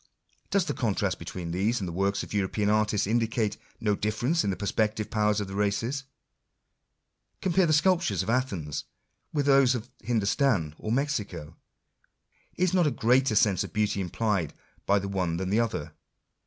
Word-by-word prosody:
Does 200 Hz, -3 st, +2 dB
the -, -, -2 dB
contrast 100 Hz, -5 st, -1 dB
between 85 Hz, 0 st, -6 dB
these 105 Hz, +7 st, +1 dB
and 95 Hz, -, -3 dB
the -, -, -4 dB
works 100 Hz, +2 st, 0 dB
of -, -, -9 dB
European 105 Hz, +1 st, 0 dB
artists 105 Hz, -1 st, +2 dB
indicate 110 Hz, 0 st, 0 dB, 0.2 s
no 105 Hz, -2 st, +1 dB
difference 120 Hz, +11 st, 0 dB
in -, -, 0 dB
the 95 Hz, -, 0 dB
perceptive 105 Hz, +2 st, -1 dB
powers 105 Hz, -1 st, +2 dB
of 100 Hz, -, -3 dB
the 95 Hz, -, -8 dB
races? 115 Hz, +7 st, -1 dB, 1.3 s
Compare 185 Hz, -1 st, +2 dB
the -, -, +2 dB
sculptures 155 Hz, -, +2 dB
of -, -, -8 dB
Athens 100 Hz, -, -2 dB, 0.5 s
with 145 Hz, -2 st, 0 dB
those 135 Hz, -2 st, +5 dB
of 120 Hz, +1 st, -6 dB
Hindostan 110 Hz, -, +1 dB
or 110 Hz, -, -4 dB
Mexico. 105 Hz, -, -2 dB, 1.0 s
Is 185 Hz, 0 st, +1 dB
not 180 Hz, -4 st, +4 dB
a -, -, +4 dB
greater 125 Hz, -1 st, +2 dB
sense 100 Hz, -3 st, +3 dB
of -, -, -9 dB
beauty 105 Hz, -2 st, 0 dB
implied 95 Hz, -3 st, -1 dB, 0.3 s
by 100 Hz, -, +4 dB
the 100 Hz, 0 st, -2 dB
one 90 Hz, -4 st, -1 dB
than 95 Hz, +1 st, -3 dB
the 110 Hz, -, +3 dB
others 100 Hz, -10 st, -1 dB
105 Hz, 170 wpm, -27 LUFS, 95-125 Hz, 1.3 s, those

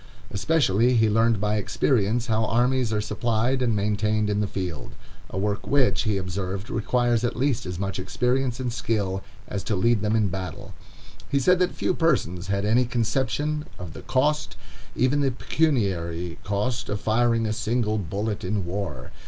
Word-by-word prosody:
Especially, 120 Hz, -1 st, +2 dB
he 110 Hz, -1 st, +4 dB
learned 115 Hz, 0 st, +3 dB
by 105 Hz, +1 st, +1 dB
experience 115 Hz, +2 st, +1 dB
how 110 Hz, -1 st, +1 dB
armies 120 Hz, +1 st, +2 dB
are 105 Hz, -, +1 dB
supplied 120 Hz, +4 st, 0 dB
and 120 Hz, -3 st, +2 dB
maintained 105 Hz, +1 st, +1 dB
in 105 Hz, -, +1 dB
the 105 Hz, -, +1 dB
field—a 90 Hz, 0 st, -7 dB
work 105 Hz, +1 st, -1 dB
which, 125 Hz, -8 st, +2 dB
he 105 Hz, -2 st, +1 dB
observed, 95 Hz, +1 st, -4 dB
requires 120 Hz, +1 st, +1 dB
at 120 Hz, -, 0 dB
least 130 Hz, -5 st, 0 dB
as 90 Hz, -1 st, -4 dB
much 100 Hz, +1 st, -3 dB
experience 125 Hz, +5 st, 0 dB
and 125 Hz, -2 st, -2 dB
skill 105 Hz, -6 st, -1 dB, 0.3 s
as 100 Hz, -, -4 dB
to 105 Hz, -, -1 dB
lead 115 Hz, +3 st, +2 dB
them 105 Hz, +1 st, +1 dB
in 110 Hz, -2 st, +3 dB
battle. 95 Hz, +2 st, -6 dB, 0.6 s
He 140 Hz, -, +1 dB
said 180 Hz, +7 st, +4 dB
that 180 Hz, -1 st, +1 dB
few -, -, 0 dB
persons 100 Hz, -, 0 dB
had 100 Hz, 0 st, 0 dB
any 120 Hz, +4 st, +3 dB
conception 135 Hz, +6 st, -1 dB
of 90 Hz, -3 st, -7 dB
the -, -, -9 dB
cost, 145 Hz, +4 st, 0 dB, 0.4 s
even 130 Hz, +4 st, +2 dB
the 140 Hz, -, +3 dB
pecuniary 95 Hz, -, -1 dB
cost, 105 Hz, +5 st, -2 dB
of 105 Hz, -, -1 dB
firing 115 Hz, +1 st, +2 dB
a 110 Hz, -, 0 dB
single 110 Hz, 0 st, 0 dB
bullet 100 Hz, +4 st, -3 dB
in 95 Hz, 0 st, -1 dB
war. 85 Hz, -9 st, -4 dB
110 Hz, 170 wpm, -25 LUFS, 100-125 Hz, 0.6 s, he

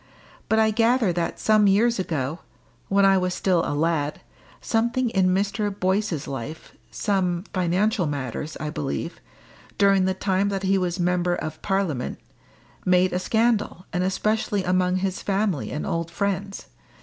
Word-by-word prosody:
But 220 Hz, -, +3 dB
I 220 Hz, 0 st, +4 dB
gather 225 Hz, -2 st, +2 dB
that 170 Hz, -1 st, -2 dB
some 215 Hz, -1 st, +4 dB
years 225 Hz, +3 st, +3 dB
ago 160 Hz, -3 st, -2 dB, 0.5 s
when 195 Hz, 0 st, +3 dB
I 195 Hz, -1 st, +5 dB
was 180 Hz, 0 st, -1 dB
still 180 Hz, -3 st, +2 dB
a 145 Hz, -, -2 dB
lad 150 Hz, -1 st, 0 dB, 0.4 s
something 235 Hz, +2 st, 0 dB
in 190 Hz, -3 st, +2 dB
Mr. 200 Hz, +3 st, 0 dB
Boyce's 190 Hz, -4 st, 0 dB
life 135 Hz, +4 st, -7 dB, 0.2 s
some 185 Hz, -4 st, -1 dB
financial 185 Hz, +1 st, +1 dB
matters, 145 Hz, +2 st, -4 dB
I 150 Hz, -1 st, -3 dB
believe 70 Hz, -, -4 dB, 0.6 s
during 195 Hz, -2 st, +4 dB
the 190 Hz, 0 st, 0 dB
time 195 Hz, +1 st, 0 dB
that 195 Hz, -1 st, -3 dB
he 195 Hz, 0 st, +2 dB
was 180 Hz, 0 st, -2 dB
member 175 Hz, 0 st, +1 dB
of 155 Hz, -1 st, -6 dB
Parliament, 190 Hz, -10 st, -1 dB, 0.7 s
made 180 Hz, 0 st, +3 dB
a 180 Hz, -, +1 dB
scandal, 220 Hz, -3 st, 0 dB
and 180 Hz, 0 st, 0 dB
especially 210 Hz, +2 st, 0 dB
among 180 Hz, 0 st, +1 dB
his 190 Hz, 0 st, -2 dB
family 195 Hz, -6 st, -1 dB
and 150 Hz, -, -4 dB
old 165 Hz, 0 st, -2 dB
friends. 200 Hz, +2 st, -3 dB
185 Hz, 150 wpm, -24 LUFS, 170-200 Hz, 0.7 s, I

